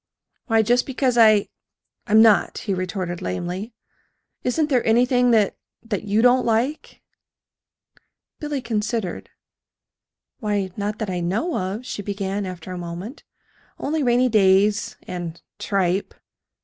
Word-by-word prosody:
"Why, 225 Hz, -2 st, +3 dB
just 245 Hz, +3 st, +2 dB
because 260 Hz, -2 st, 0 dB
I 215 Hz, -3 st, +5 dB, 0.6 s
I'm 220 Hz, 0 st, +6 dB
not," 220 Hz, -3 st, +4 dB
he 200 Hz, -, -2 dB
retorted 185 Hz, -1 st, -3 dB
lamely. 175 Hz, -, -4 dB, 0.7 s
"Isn't 300 Hz, +5 st, 0 dB
there 255 Hz, -4 st, +2 dB
anything 245 Hz, +2 st, +3 dB
that 220 Hz, -4 st, +3 dB, 0.3 s
that 215 Hz, -3 st, -4 dB
you 210 Hz, +2 st, +1 dB
don't 250 Hz, +1 st, +5 dB
like?" 240 Hz, +6 st, -1 dB, 1.4 s
Billy 295 Hz, -2 st, -3 dB
considered. 220 Hz, -3 st, -3 dB, 1.1 s
"Why, 205 Hz, -5 st, -1 dB
not 210 Hz, +1 st, -3 dB
that 215 Hz, -4 st, -3 dB
I 180 Hz, -, -2 dB
know 205 Hz, -, -1 dB
of," 195 Hz, +6 st, -3 dB
she 205 Hz, -, -5 dB
began, 200 Hz, 0 st, -3 dB
after 180 Hz, 0 st, -8 dB
a 180 Hz, -, -5 dB
moment, 175 Hz, -, -7 dB, 0.5 s
"only 310 Hz, +2 st, -2 dB
rainy 250 Hz, -1 st, +3 dB
days 205 Hz, -1 st, +3 dB
and 175 Hz, -2 st, -6 dB, 0.2 s
tripe. 195 Hz, -1 st, -1 dB
210 Hz, 125 wpm, -22 LUFS, 190-245 Hz, 1.4 s, I'm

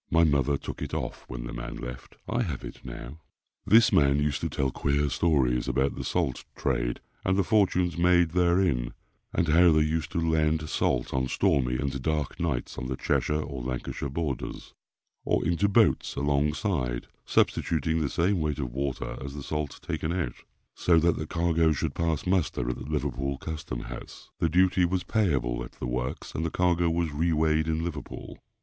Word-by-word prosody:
My 80 Hz, +1 st, +4 dB
mother 70 Hz, -2 st, +2 dB
took -, -, -7 dB
it -, -, -3 dB
off -, -, -4 dB
when -, -, -6 dB
the -, -, -6 dB
man -, -, -5 dB
left. 60 Hz, +1 st, -8 dB
I 120 Hz, +2 st, 0 dB
have 80 Hz, -, -3 dB
it -, -, -9 dB
now. 65 Hz, +7 st, -8 dB, 0.5 s
This 115 Hz, +1 st, +6 dB
man 70 Hz, -1 st, +5 dB
used 75 Hz, -1 st, 0 dB
to -, -, -1 dB
tell 65 Hz, -1 st, 0 dB
queer 70 Hz, +2 st, 0 dB
stories 65 Hz, -7 st, +2 dB
about 65 Hz, +1 st, +1 dB
the -, -, -5 dB
salt 65 Hz, -, -1 dB
trade, -, -, -1 dB, 0.2 s
and 95 Hz, +1 st, +1 dB
the 100 Hz, -, +3 dB
fortunes 90 Hz, -4 st, +2 dB
made 90 Hz, -1 st, +4 dB
therein, 85 Hz, -8 st, +2 dB, 0.4 s
and 85 Hz, -, 0 dB
how 85 Hz, +2 st, +6 dB
they 80 Hz, 0 st, +4 dB
used 80 Hz, 0 st, -1 dB
to -, -, +1 dB
land 80 Hz, -1 st, +1 dB
salt 65 Hz, -1 st, 0 dB
on 65 Hz, -1 st, +1 dB
stormy 65 Hz, -1 st, +2 dB
and 65 Hz, 0 st, -2 dB
dark 75 Hz, 0 st, -1 dB
nights 80 Hz, -8 st, -2 dB
on 65 Hz, -, -4 dB
the 65 Hz, -, -2 dB
Cheshire 75 Hz, +1 st, 0 dB
or 70 Hz, -3 st, -6 dB
Lancashire 65 Hz, +2 st, -4 dB
borders, 70 Hz, -1 st, -4 dB, 0.5 s
or -, -, +1 dB
into 85 Hz, +4 st, +2 dB
boats 105 Hz, -1 st, +3 dB
alongside, 70 Hz, -, 0 dB, 0.2 s
substituting 80 Hz, 0 st, +1 dB
the 75 Hz, -, 0 dB
same 90 Hz, +4 st, +1 dB
weight 75 Hz, -2 st, -1 dB
of 65 Hz, -5 st, -4 dB
water 70 Hz, 0 st, -3 dB
as 70 Hz, +1 st, -6 dB
the 70 Hz, -, -6 dB
salt 75 Hz, -1 st, -3 dB
taken 80 Hz, -, -2 dB
out, 85 Hz, -9 st, -1 dB, 0.4 s
so 85 Hz, -2 st, +3 dB
that 85 Hz, +1 st, +3 dB
the 75 Hz, -, -4 dB
cargo 85 Hz, -1 st, +2 dB
should 70 Hz, -, -2 dB
pass 80 Hz, -3 st, -1 dB
muster 90 Hz, -9 st, +1 dB
at -, -, -4 dB
the -, -, -7 dB
Liverpool 70 Hz, -2 st, -2 dB
Custom 70 Hz, -4 st, -5 dB
House. -, -, -9 dB
The 85 Hz, -, +2 dB
duty 90 Hz, +2 st, +3 dB
was 90 Hz, +1 st, +1 dB
payable 65 Hz, -, 0 dB
at -, -, -10 dB
the -, -, -6 dB
works, 60 Hz, +1 st, -3 dB
and 80 Hz, -, -2 dB
the 80 Hz, -, 0 dB
cargo 85 Hz, 0 st, +2 dB
was 85 Hz, -1 st, 0 dB
re 85 Hz, +3 st, +1 dB
weighed 80 Hz, 0 st, +2 dB
in 80 Hz, 0 st, 0 dB
Liverpool. 80 Hz, -5 st, -6 dB
75 Hz, 185 wpm, -27 LUFS, 65-85 Hz, 0.5 s, This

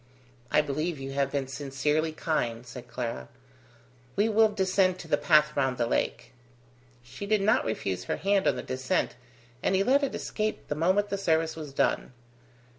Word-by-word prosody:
"I -, -, +4 dB
believe 155 Hz, +3 st, -2 dB
you 135 Hz, 0 st, -5 dB
have 140 Hz, 0 st, 0 dB
been 140 Hz, -2 st, -1 dB
sincerely 145 Hz, +4 st, -1 dB
kind," 125 Hz, -7 st, -2 dB
said 125 Hz, 0 st, -9 dB
Clara. 115 Hz, -, -5 dB, 0.9 s
"We 210 Hz, +3 st, +2 dB
will 220 Hz, 0 st, +5 dB
descend 190 Hz, -2 st, +2 dB
to -, -, -10 dB
the -, -, +3 dB
path 150 Hz, -2 st, +3 dB
round 130 Hz, -3 st, +1 dB
the 120 Hz, -, +1 dB
lake." -, -, -1 dB, 0.7 s
She 200 Hz, -, -8 dB
did 210 Hz, -1 st, +2 dB
not 215 Hz, +4 st, +3 dB
refuse 95 Hz, -4 st, -2 dB
her -, -, -2 dB
hand 195 Hz, 0 st, +2 dB
on -, -, +3 dB
the -, -, -5 dB
descent, 130 Hz, 0 st, -1 dB, 0.5 s
and 190 Hz, -, +1 dB
he 190 Hz, -, +3 dB
let 270 Hz, +6 st, +4 dB
it 280 Hz, -, -1 dB
escape 215 Hz, 0 st, -3 dB
the -, -, +1 dB
moment 185 Hz, +7 st, +2 dB
the 200 Hz, -, -2 dB
service 160 Hz, -3 st, +1 dB
was 155 Hz, -3 st, -7 dB
done. 135 Hz, -, 0 dB
155 Hz, 180 wpm, -28 LUFS, 130-195 Hz, 0.9 s, will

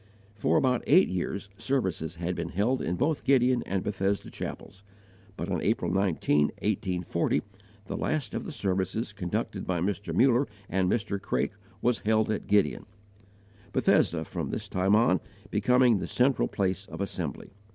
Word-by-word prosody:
For 100 Hz, -, +1 dB
about 125 Hz, -2 st, +2 dB
eight 180 Hz, +6 st, +6 dB
years, 95 Hz, +2 st, -3 dB
services 95 Hz, -, -1 dB
had 85 Hz, +2 st, -2 dB
been -, -, -3 dB
held 115 Hz, +8 st, +1 dB
in 85 Hz, -, -1 dB
both 145 Hz, -, 0 dB
Gideon 125 Hz, -2 st, +4 dB
and 95 Hz, -1 st, -1 dB
Bethesda 100 Hz, 0 st, -1 dB
chapels; 95 Hz, -, -7 dB, 0.6 s
but -, -, -3 dB
on 90 Hz, -5 st, -1 dB
April 95 Hz, -6 st, 0 dB
19, 85 Hz, -6 st, +2 dB
1840, 90 Hz, -3 st, -1 dB, 0.4 s
the -, -, -5 dB
last 145 Hz, -9 st, -1 dB
of -, -, -3 dB
the -, -, -5 dB
services 95 Hz, +3 st, -2 dB
conducted 90 Hz, -4 st, -3 dB
by 90 Hz, -2 st, 0 dB
Mr. 100 Hz, +3 st, -2 dB
Muller 130 Hz, +2 st, +4 dB, 0.2 s
and 95 Hz, 0 st, +1 dB
Mr. 100 Hz, -3 st, -1 dB
Craik -, -, 0 dB, 0.3 s
was 120 Hz, -3 st, +2 dB
held 110 Hz, 0 st, +2 dB
at 110 Hz, -, -3 dB
Gideon, 100 Hz, -1 st, +2 dB, 0.9 s
Bethesda, 80 Hz, -2 st, +2 dB
from -, -, -4 dB
this -, -, -4 dB
time 95 Hz, +2 st, +2 dB
on, 105 Hz, -5 st, +4 dB, 0.3 s
becoming 125 Hz, -4 st, +4 dB
the -, -, -4 dB
central 130 Hz, +2 st, +2 dB
place 95 Hz, 0 st, -1 dB
of 80 Hz, +1 st, -8 dB
assembly. 90 Hz, -8 st, -4 dB
100 Hz, 155 wpm, -28 LUFS, 90-120 Hz, 0.9 s, eight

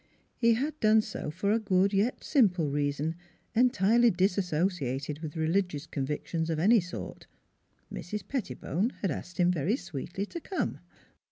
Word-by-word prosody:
He 230 Hz, -1 st, +4 dB
had 295 Hz, +6 st, -2 dB
done 215 Hz, 0 st, +5 dB
so 215 Hz, -7 st, -5 dB
for 185 Hz, +6 st, -1 dB
a 225 Hz, -, +3 dB
good 195 Hz, -1 st, +2 dB
yet 205 Hz, +6 st, +1 dB
simple 180 Hz, -, +3 dB
reason 145 Hz, +2 st, -1 dB, 0.4 s
entirely 235 Hz, -1 st, +4 dB
disassociated 175 Hz, -, 0 dB
with 155 Hz, -1 st, -6 dB
religious 160 Hz, -1 st, 0 dB
convictions 155 Hz, +3 st, -3 dB
of 160 Hz, -, 0 dB
any 215 Hz, +8 st, +5 dB
sort: 115 Hz, -, -7 dB, 0.7 s
Mrs. 210 Hz, +6 st, -5 dB
Pettibone 205 Hz, -, -2 dB
had 195 Hz, -, +1 dB
asked 175 Hz, +4 st, -6 dB
him 180 Hz, 0 st, +4 dB
very 180 Hz, -, +1 dB
sweetly 175 Hz, -, -5 dB
to 340 Hz, -, -7 dB
come. 380 Hz, -, -3 dB
180 Hz, 145 wpm, -29 LUFS, 155-215 Hz, 0.7 s, done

